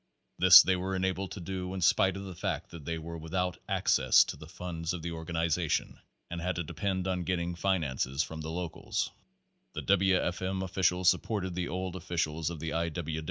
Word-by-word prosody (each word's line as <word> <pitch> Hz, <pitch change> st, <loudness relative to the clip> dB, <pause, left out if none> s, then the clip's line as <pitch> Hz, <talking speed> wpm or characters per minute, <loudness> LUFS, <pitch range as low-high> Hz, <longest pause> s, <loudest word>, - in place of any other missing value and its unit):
This -, -, +10 dB
they 95 Hz, -, +2 dB
were 95 Hz, +1 st, -2 dB
enabled 95 Hz, 0 st, -1 dB
to -, -, -7 dB
do 90 Hz, +1 st, -4 dB
in 95 Hz, -, -4 dB
spite 95 Hz, +2 st, +3 dB
of 100 Hz, -, -6 dB
the 95 Hz, -1 st, -7 dB
fact 85 Hz, -, -3 dB
that 80 Hz, -4 st, -10 dB
they 85 Hz, +1 st, -2 dB
were 85 Hz, +1 st, -7 dB
without 90 Hz, +2 st, -2 dB
access -, -, +4 dB
to -, -, -6 dB
the 75 Hz, -, -12 dB
funds 85 Hz, -1 st, -4 dB
of 85 Hz, -3 st, -6 dB
the 85 Hz, -, -3 dB
organization, 80 Hz, 0 st, -1 dB, 0.3 s
and 85 Hz, 0 st, -4 dB
had 90 Hz, +1 st, -1 dB
to 85 Hz, -, -2 dB
depend 95 Hz, +4 st, -2 dB
on 90 Hz, -1 st, -1 dB
getting 85 Hz, 0 st, -1 dB
finances 80 Hz, -6 st, 0 dB
from 80 Hz, -2 st, -7 dB
the 80 Hz, -, -5 dB
locals. 85 Hz, 0 st, -3 dB, 0.6 s
The -, -, -5 dB
W. 95 Hz, -1 st, +4 dB
F. 90 Hz, 0 st, -2 dB
M. 95 Hz, 0 st, -2 dB
officials 90 Hz, -1 st, +1 dB
supported 95 Hz, -1 st, +1 dB
the 90 Hz, 0 st, -2 dB
old 95 Hz, 0 st, -4 dB
officials 80 Hz, -3 st, -2 dB
of 85 Hz, -3 st, -6 dB
the 80 Hz, +1 st, -4 dB
I. 85 Hz, 0 st, 0 dB
90 Hz, 200 wpm, -30 LUFS, 80-95 Hz, 0.6 s, This